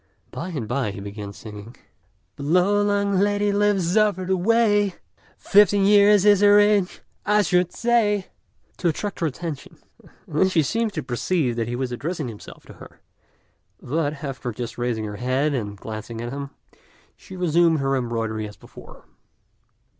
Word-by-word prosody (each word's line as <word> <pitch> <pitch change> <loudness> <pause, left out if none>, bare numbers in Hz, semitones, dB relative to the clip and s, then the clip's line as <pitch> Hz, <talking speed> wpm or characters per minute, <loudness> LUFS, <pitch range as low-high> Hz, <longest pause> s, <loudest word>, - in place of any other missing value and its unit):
By 175 - -5
and 140 -11 -4
by 125 -2 -1
he 100 - -7
began 100 0 -7
singing 105 +2 -11 0.6
"The - - -10
Lo 180 +7 +2
yang 200 -1 +1
lady 205 +1 +1
lives 200 -3 +1
over 210 -4 +2
the 190 +1 +1
way: 205 0 +2 0.4
[Fifteen 205 -1 +4
years 205 0 +5
is 205 -1 +5
her 205 0 +6
age 205 -2 +2 0.2
I 210 0 +3
should 180 -1 +1
say]." 220 -5 +1 0.5
to 175 - -1
attract 200 +5 -3
her 165 - +1
attention, 155 0 -7 0.2
and 150 - -11
then 190 - +4
she 165 -4 +2
seemed 225 - -1
to 155 -5 -4
perceive 125 +1 -1
that 115 -1 -2
he 120 - -3
was 130 0 -3
addressing 150 +2 -4
himself 105 -3 -12
to - - -13
her; - - -14 0.8
but, 145 +1 -3
after 135 -3 -4
just 120 +1 -6
raising 120 -3 -2
her 105 -1 -6
head 130 +5 0
and 105 -6 -4
glancing 110 +2 -7
at 120 +2 -5
him, 140 0 -5 0.7
she 190 - -13
resumed 170 -1 +3
her 135 0 0
embroidery 115 -3 -2
as 105 - -13
before. - - -15
165 Hz, 165 wpm, -23 LUFS, 120-205 Hz, 0.8 s, her